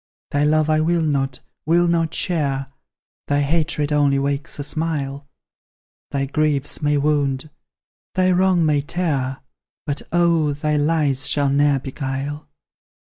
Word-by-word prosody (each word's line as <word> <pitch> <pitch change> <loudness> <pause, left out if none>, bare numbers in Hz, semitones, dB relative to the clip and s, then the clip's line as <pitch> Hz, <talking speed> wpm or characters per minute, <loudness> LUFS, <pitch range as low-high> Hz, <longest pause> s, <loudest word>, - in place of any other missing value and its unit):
Thy 145 0 +1
love 155 0 +3
I 155 0 +3
will 165 +1 +1
not, 135 -3 -1 0.2
will 170 +2 +3
not 165 -1 +1
share; 140 -7 -1 0.5
Thy 145 0 +2
hatred 150 0 0
only 145 -2 +3
wakes 140 +1 -2
a 145 - -4
smile; 145 -2 -3 0.8
Thy 140 -1 -1
griefs 145 0 -1
may 150 0 +2
wound 145 0 0 0.6
thy 185 0 +3
wrongs 180 -2 +3
may 150 -2 +2
tear, 140 -5 -2 0.4
But, 145 0 -2
oh, 165 -3 +2
thy 150 +1 -1
lies 145 -2 +1
shall 140 -2 +1
ne'er 145 0 +3
beguile! 135 +2 -5
145 Hz, 135 wpm, -21 LUFS, 140-160 Hz, 0.8 s, love